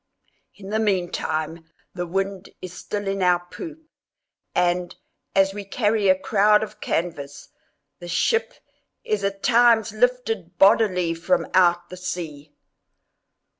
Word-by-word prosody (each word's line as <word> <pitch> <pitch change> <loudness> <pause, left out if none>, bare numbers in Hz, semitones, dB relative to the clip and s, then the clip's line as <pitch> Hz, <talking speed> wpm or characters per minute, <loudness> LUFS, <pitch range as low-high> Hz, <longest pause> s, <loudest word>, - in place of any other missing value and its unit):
In 195 -1 -11
the 215 +1 0
meantime 170 -5 -2 0.2
the 175 -1 -4
wind 195 +1 -3
is 185 -1 -8
still 205 +1 -5
in 195 0 -1
our 175 -1 +2
poop, 320 -3 -8 0.7
and, 175 0 0 0.4
as 195 0 +3
we 205 0 -6
carry 210 0 +1
a 185 - +5
crowd 210 +2 +3
of 215 0 -9
canvas, 145 -5 -3 0.5
the 175 - -9
ship 450 - 0 0.5
is 210 -2 -1
at 195 0 -3
times 235 -3 +4
lifted 225 -6 -1
bodily 195 -4 +4
from 165 +12 0
out 175 -1 +3
the 185 - -9
sea! 155 -5 -6
195 Hz, 130 wpm, -23 LUFS, 175-215 Hz, 0.7 s, a